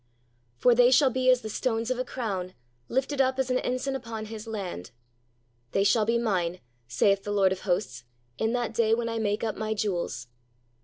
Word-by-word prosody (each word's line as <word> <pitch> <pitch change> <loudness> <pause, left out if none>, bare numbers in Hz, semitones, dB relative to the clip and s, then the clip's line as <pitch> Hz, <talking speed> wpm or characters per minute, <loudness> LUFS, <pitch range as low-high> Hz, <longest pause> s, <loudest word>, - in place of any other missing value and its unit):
"For 245 - +5
they 245 +1 +6
shall 265 +1 +5
be 255 +1 +1
as 255 -1 +5
the 220 - -6
stones 230 0 -1
of 255 - -1
a - - +1
crown, 200 -8 -4 0.3
lifted 270 +2 0
up 260 0 +1
as 260 -1 0
an 255 - +2
ensign 255 +2 -2
upon 225 -4 -5
His 220 0 -8
land." 195 - -5 0.8
"They 195 - +3
shall 210 +2 +3
be 230 +2 +2
Mine, 185 -6 -1 0.3
saith 195 - +2
the 205 - -4
Lord 195 -2 +3
of 190 - -2
hosts, 175 - -2 0.4
in 220 - +1
that 240 -2 -1
day 225 0 +3
when 230 0 -2
I 230 0 -2
make 210 0 -1
up 220 -2 0
My 220 0 -2
jewels." 175 - -2
225 Hz, 200 wpm, -27 LUFS, 200-250 Hz, 0.8 s, they